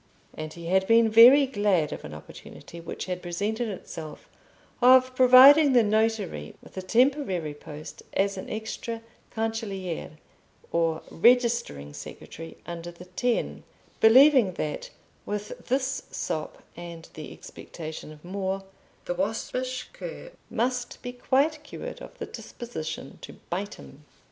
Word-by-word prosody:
And 155 0 -6
he 170 -1 -10
had 190 +2 +2
been 230 0 +5
very 250 +6 +9
glad 205 - +1
of - - -8
an - - -8
opportunity 120 - -11
which 165 - -6
had 180 -1 -4
presented 205 +7 -2
itself 160 -5 -8 0.5
of 255 +1 +6
providing 265 +3 +8
the 240 -2 +6
notary 215 - 0
with - - -16
a 190 - -3
temporary 195 - +1
post 150 +1 -10
as 195 0 +1
an 190 - -7
extra 225 +1 -5 0.3
cancelliere 200 -8 -4 0.5
or 165 -1 0
registering 235 - +2
secretary 160 - -9
under 170 0 -6
the 175 +1 -12
Ten, 235 +7 -1 0.4
believing 250 -3 +7
that 150 -3 -4 0.4
with 210 0 -5
this 265 +1 0
sop 155 - -4
and 170 -1 -9
the 155 -2 -8
expectation 155 -2 -9
of 150 +2 -14
more, 195 +1 -3 0.4
the - - -1
waspish 250 +7 -3
cur - - -8 0.2
must 245 +1 -2
be 245 - -4
quite 285 +5 +1
cured - - -8
of - - -11
the - - -5
disposition 160 - -7
to - - -9 0.2
bite 200 +4 -3
him. 145 +2 -14
205 Hz, 135 wpm, -27 LUFS, 170-245 Hz, 0.5 s, very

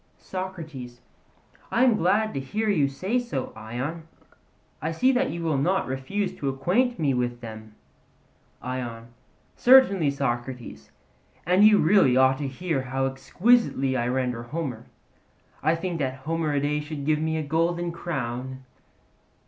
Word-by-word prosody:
SOCRATES: 160 -10 -7 0.7
I 240 - +2
am 250 -4 +5
glad 210 +5 +1
to - - -2
hear 210 +12 -2
you 150 -8 +3
say 190 - -1
so, 160 - -4
Ion; 130 +9 -5 0.7
I 155 - -1
see 255 +10 +3
that 260 +1 +1
you 170 0 -4
will 155 -4 +1
not 185 +7 +1
refuse 135 +11 -3
to 140 - -2
acquaint 200 - +1
me 140 -4 +1
with 120 -1 -2
them. 110 -2 -9 0.9
ION: 120 -2 -5 0.5
Certainly, 240 - +6
Socrates; 120 - -4 0.6
and 180 +4 +4
you 215 -1 +7
really 160 -8 +4
ought 130 +1 +4
to 145 - -2
hear 150 +1 -2
how 135 +1 -2
exquisitely 135 - +2
I 120 -1 0
render 125 -2 -1
Homer. 120 -2 -5 0.7
I 160 +3 +2
think 170 0 -3
that 130 -1 -3
the - - -16
Homeridae 150 -2 0
should 150 -2 -6
give 155 0 +2
me 160 0 -1
a 155 - -1
golden 170 +3 0
crown. 130 -6 -4
145 Hz, 145 wpm, -25 LUFS, 130-175 Hz, 0.9 s, you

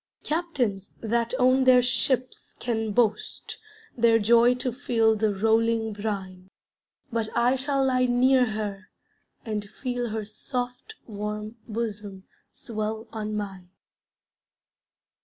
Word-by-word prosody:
Captains 270 - -1
that 235 +1 0
own 255 +1 +4
their 255 -1 +6
ships 255 +1 -1
can 225 -3 -1
boast 215 -1 -1 0.4
Their 230 -1 +5
joy 235 +3 +5
to 250 -1 -3
feel 225 -4 +2
the 215 0 +1
rolling 225 +2 +1
brine 190 -3 -5 0.6
But 225 -1 -1
I 245 +2 +4
shall 270 +1 0
lie 255 -1 +3
near 250 +1 +4
her, 205 -3 -4 0.6
and 210 -2 -3
feel 245 0 -3
Her 215 -1 -3
soft 245 - -5
warm 210 +1 -5
bosom 210 -4 -5 0.3
swell 220 0 -5
on 215 -1 -4
mine. 190 -4 -5
225 Hz, 115 wpm, -26 LUFS, 210-245 Hz, 0.6 s, their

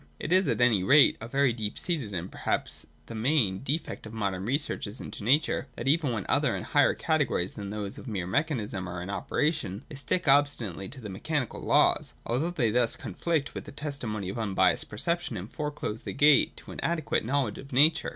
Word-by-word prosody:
It 155 - -4
is 185 0 +4
at - - 0
any 120 -6 +4
rate 140 +7 +6
a 115 - -5
very 135 0 +2
deep 110 -3 -4
seated, 150 - 0
and 90 -1 -4
perhaps - - 0 0.2
the - - -9
main, 110 -5 +1
defect 140 -4 -3
of 110 - -10
modern 100 -4 -2
researches 125 -4 -2
into - - -8
nature, 145 +8 +2
that, 115 - -5
even 145 -1 +3
where 110 -4 -3
other - - +2
and - - -5
higher - - +3
categories 145 - 0
than 100 -2 -7
those 105 -1 -5
of - - -11
mere 100 -6 -3
mechanism 105 - -1
are 85 0 -5
in 95 - -5
operation, 115 - -1
they - - -10
still 145 +6 0
stick 175 - -10
obstinately 135 -10 +2
to 130 0 -10
the 105 - -7
mechanical 130 +6 -3
laws; - - +3
although 135 +8 0
they 130 -11 0
thus 120 0 +2
conflict 160 -4 -2
with - - -6
the - - -9
testimony 125 -10 -4
of 100 - -4
unbiassed 95 -4 +1
perception, 170 +2 -1
and 95 +4 -7
foreclose 150 -7 -4
the - - -5
gate 145 0 +4
to - - -11
an - - -8
adequate 165 -3 0
knowledge 130 -2 -1
of 140 - -11
nature. 150 +4 +4
120 Hz, 205 wpm, -28 LUFS, 105-145 Hz, 0.2 s, rate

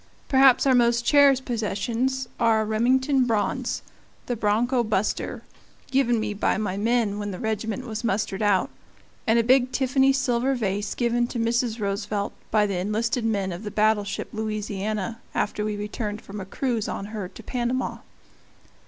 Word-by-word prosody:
Perhaps 265 -1 +5
our 265 - +5
most 235 -1 +3
cherished 280 -2 +5
possessions 240 +3 -1
are 225 -2 +3
a - - -1
Remington 255 +5 +2
bronze, 220 -4 -1 0.4
"The 245 - -2
Bronco 235 +4 +1
Buster," 215 -2 -1 0.5
given 250 -3 +2
me 215 -1 -2
by 205 - 0
my 205 -3 -2
men 215 -1 +1
when 205 0 -3
the 185 - -5
regiment 220 +3 -3
was 220 -1 -5
mustered 205 -3 -1
out, 205 -3 +2 0.6
and 225 +1 +4
a 230 - +4
big 255 +1 +4
Tiffany 265 +1 +3
silver 260 0 +1
vase 205 -3 -2
given 240 0 +1
to 245 - -5
Mrs. 235 0 0
Roosevelt 200 0 -2 0.2
by 210 -1 +3
the 200 -3 -2
enlisted 225 +5 -1
men 200 -4 0
of 175 +2 -6
the 215 - -5
battleship 210 -1 0
Louisiana 215 0 -3 0.2
after 210 - -1
we 210 0 -2
returned 210 0 -4
from 200 0 -7
a - - -6
cruise 230 +2 -2
on 195 - -4
her 205 -4 -4
to 185 - -13
Panama. 250 0 -2
220 Hz, 160 wpm, -25 LUFS, 210-245 Hz, 0.6 s, Perhaps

